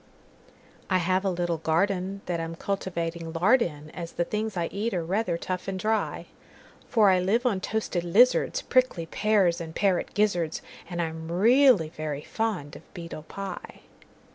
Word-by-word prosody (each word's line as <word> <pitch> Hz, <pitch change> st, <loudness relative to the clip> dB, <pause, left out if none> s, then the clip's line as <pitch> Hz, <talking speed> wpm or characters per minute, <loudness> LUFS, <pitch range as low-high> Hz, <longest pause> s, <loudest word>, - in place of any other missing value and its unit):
I 185 Hz, -, +3 dB
have 185 Hz, +2 st, +1 dB
a 195 Hz, -, +1 dB
little 175 Hz, -2 st, -1 dB
gardenThat 180 Hz, +2 st, -1 dB
I'm 165 Hz, 0 st, -4 dB
cultivating 170 Hz, -3 st, -3 dB
lard 205 Hz, +10 st, +4 dB
in, 150 Hz, -5 st, -4 dB
As 170 Hz, -2 st, -7 dB
the 175 Hz, -, 0 dB
things 215 Hz, +1 st, -3 dB
I 170 Hz, -, 0 dB
eat 210 Hz, +1 st, -2 dB
are 170 Hz, -2 st, -1 dB
rather 185 Hz, -1 st, 0 dB
tough 185 Hz, +2 st, -4 dB
and 195 Hz, -1 st, -2 dB
dry; 220 Hz, +3 st, -1 dB, 0.6 s
For 210 Hz, -4 st, +5 dB
I 185 Hz, -, +4 dB
live 210 Hz, +7 st, +1 dB
on 210 Hz, -6 st, +2 dB
toasted 210 Hz, -5 st, -2 dB
lizards, 235 Hz, +9 st, +3 dB
Prickly 255 Hz, -10 st, +2 dB
pears, 190 Hz, -2 st, +2 dB
and 160 Hz, -1 st, -7 dB
parrot 195 Hz, -3 st, 0 dB
gizzards, 180 Hz, -6 st, +1 dB, 0.3 s
And 175 Hz, -1 st, -2 dB
I'm 160 Hz, 0 st, -5 dB
really 225 Hz, -, +5 dB
very 155 Hz, -2 st, -5 dB
fond 205 Hz, -10 st, -3 dB
of -, -, -15 dB
beetle 170 Hz, -3 st, -7 dB
pie. 195 Hz, -1 st, -7 dB
180 Hz, 160 wpm, -27 LUFS, 165-210 Hz, 0.6 s, For